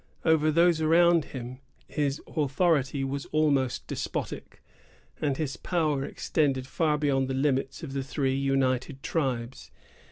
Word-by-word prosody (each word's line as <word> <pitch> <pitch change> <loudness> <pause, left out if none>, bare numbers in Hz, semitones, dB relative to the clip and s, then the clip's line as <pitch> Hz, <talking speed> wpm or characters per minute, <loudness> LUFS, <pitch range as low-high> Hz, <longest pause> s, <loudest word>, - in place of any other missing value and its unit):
Over 160 -1 +4
those 170 +1 +3
around 170 0 +4
him 130 0 -7 0.3
his 145 -1 -1
authority 145 -2 +1
was 135 +1 -3
almost 140 -5 +1
despotic, - - -5 0.6
and 140 -3 0
his 135 -5 -3
power 155 -6 0
extended 135 -3 0
far 150 +2 0
beyond 135 -3 +1
the 130 - -2
limits 135 +2 0
of 140 -4 -6
the 135 - -1
three 135 -1 -1
united 135 0 0
tribes. 130 -6 -2
140 Hz, 130 wpm, -27 LUFS, 135-155 Hz, 0.6 s, Over